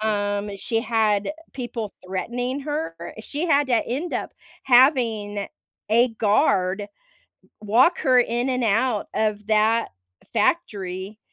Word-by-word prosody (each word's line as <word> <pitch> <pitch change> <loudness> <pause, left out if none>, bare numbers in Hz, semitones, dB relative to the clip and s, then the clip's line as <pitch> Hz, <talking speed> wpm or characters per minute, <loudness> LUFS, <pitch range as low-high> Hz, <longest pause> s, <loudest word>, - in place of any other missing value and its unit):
um, 205 -1 -1
she 225 +3 -1
had 220 +1 +1 0.2
people 240 -5 -5
threatening 245 +8 -3
her. 300 +3 -3 0.3
She 300 +5 -4
had 290 -3 +3
to 240 -2 +2
end 295 +9 -3
up - - -3 0.3
having 235 -6 +3 0.4
a 240 +3 +5
guard 200 -2 +1 0.8
walk 240 - +3
her 255 -4 +4
in 240 +2 0
and 250 -1 0
out 225 0 +1
of 210 -1 -1
that 220 +1 +2 0.4
factory, 200 - -1
225 Hz, 115 wpm, -23 LUFS, 205-255 Hz, 0.8 s, a